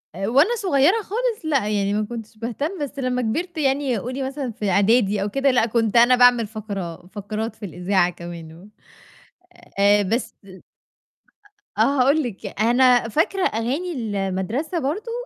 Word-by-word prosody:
آآ، 195 +2 -3
وأنا 285 - +3
صغيرة 365 +2 +2
خالص 445 -1 -3
لأ 275 -9 +1
يعني 200 -1 0
ما 210 +1 0
كنتش 225 -1 -9
باهتم، 280 - -4
بس 280 0 -6
لمّا 250 -1 -1
كبرت 330 +10 -3
يعني 275 -3 0
قولي 255 +6 -4
مثلًا 265 -1 -4
في 215 -2 -3
إعدادي 200 +1 +2
أو 205 - -1
كده، 275 +4 +1
لأ 240 -3 +3
كنت 225 -1 0
أنا 240 +2 +6
باعمل 245 -2 +5
فقرة 200 -6 -7
فقرات 210 +3 -5
في 210 - -8
الإذاعة 180 0 0
كمان 170 -2 -9
و 180 +5 -15 1.1
آآ، 205 +1 +4
بس 225 +6 -2 1.4
آه - - +2 0.2
هاقول 285 +5 +3
لِك، 215 -3 -6
أنا 245 0 +4
فاكرة 350 - 0
أغاني 265 +11 -2 0.4
المدرسة 235 - -2
برضه 335 - -3
235 Hz, 155 wpm, -22 LUFS, 205-280 Hz, 1.4 s, أنا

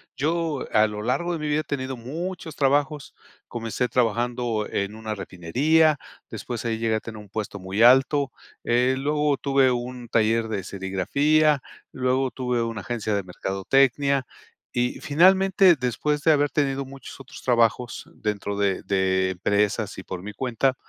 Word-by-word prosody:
yo 160 +1 -1
a 110 -1 +4
lo 105 0 -6
largo 155 +9 0
de 165 - -3
mi 150 - -3
vida 150 +1 +1
he - - -10
tenido 130 -2 -4
muchos 165 +7 -6
trabajos, 145 +1 0 0.4
comencé 120 +1 -2
trabajando 120 -2 0
en 100 +1 -2
una 110 -1 -5
refinería, 140 - +2 0.3
después 120 -3 -5
ahí 115 -1 -1
llegué 115 -1 +1
a - - 0
tener 110 -2 -8
un 105 -1 -12
puesto 105 -1 -5
muy 95 +4 0
alto, 135 +3 +5 0.3
eh, 125 +2 +2
luego 150 +1 +1
tuve 135 -2 +3
un 125 0 -4
taller 115 0 +2
de 105 -4 -3
serigrafía, 140 - +1 0.3
luego 130 0 0
tuve 125 -2 -1
una 115 -3 -4
agencia 110 0 -3
de 100 -1 0
mercadotecnia, 130 +9 +1 0.5
y 125 0 -1
finalmente 190 +3 +5
después 145 +3 -1
de 160 - +5
haber 145 -1 +2
tenido 140 -2 0
muchos 135 +1 -11
otros 135 - -12
trabajos 120 -1 +1
dentro 100 -1 -3
de 100 -2 0
de 95 -1 +1
empresas 100 +3 0
y 95 - -7
por 90 -1 -6
mi 105 +3 -7
cuenta, 130 +3 0
125 Hz, 160 wpm, -24 LUFS, 105-140 Hz, 0.5 s, alto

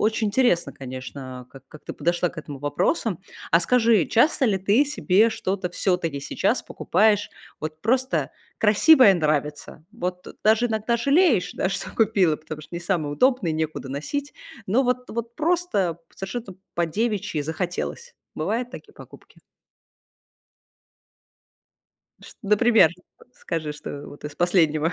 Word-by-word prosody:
очень 220 0 +1
интересно, 200 - +2
конечно, 130 -1 -8
как 135 0 -15
как 150 +2 -15
ты - - -6
подошла 175 +1 0
к 175 - -11
этому 145 -3 -8
вопросам. 180 - 0 0.3
А 165 - +6
скажи, 225 -3 +3
часто 270 +4 +3
ли 205 - +2
ты 205 +8 +3
себе 225 -7 +2
что-то 195 -4 -2
всё-таки 175 -5 -1
сейчас - - 0
покупаешь, 205 +2 +1 0.3
вот 155 0 -6
просто 260 +4 +1 0.3
красивое, 220 +2 +6
нравится? 150 -1 -2
Вот 180 -5 -5 0.2
даже 220 +3 +4
иногда 220 +1 0
жалеешь, 275 - +3
да, - - 0
что 190 - -4
купила, 195 -8 +2
потому 155 0 -8
что 165 - -12
не - - -5
самое 170 -5 -1
удобное 250 - +2
и - - -1
некуда 155 -3 -3
носить. 280 - -4 0.3
Но 240 +8 +2
вот 250 0 -1
вот 235 +1 -5
просто 315 - 0 0.2
совершенно 195 +1 -6 0.2
по-девичьи 175 -1 -1
захотелось. 180 - -4 0.2
Бывают 225 +10 -2
такие 425 - -11
покупки? - - -15 2.8
Шт - - -14
вот 200 - -6
например, 220 -5 +5 0.4
скажи, 155 +2 -4
что 145 -1 -8
вот 145 - -13
из 150 0 -6
последнего 165 -3 +2
190 Hz, 135 wpm, -24 LUFS, 155-235 Hz, 2.8 s, А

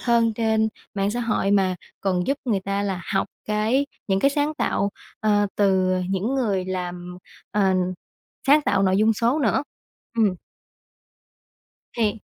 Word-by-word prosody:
hơn 235 -2 +3
trên 220 -1 +2 0.3
mạng 200 0 0
xã 240 +3 -2
hội, 215 -4 0
mà 190 -2 +3 0.3
còn 180 -2 0
giúp 275 - +1
người 215 -6 +1
ta 200 +1 -2
là 195 -2 -2
học 195 - +1 0.2
cái 220 +6 +1 0.2
những 195 0 +2
cái 275 - +4
sáng 290 +2 0
tạo, 200 -8 0 0.3
ờ, 205 -1 +3
từ, 190 -2 +3
ờ, 185 - 0
những 195 +7 0
người 205 -8 0
làm, 180 -1 -5 0.3
ờ, 195 -2 +2 0.7
sáng 290 +3 +6
tạo 200 -7 +2
nội 190 -1 +3
dung 215 +2 +4
số 235 +6 +1
nữa. 265 -2 +2 0.5
Ừm. 210 -5 +3 1.6
Thì 220 -2 -1
205 Hz, 155 wpm, -23 LUFS, 190-230 Hz, 1.6 s, sáng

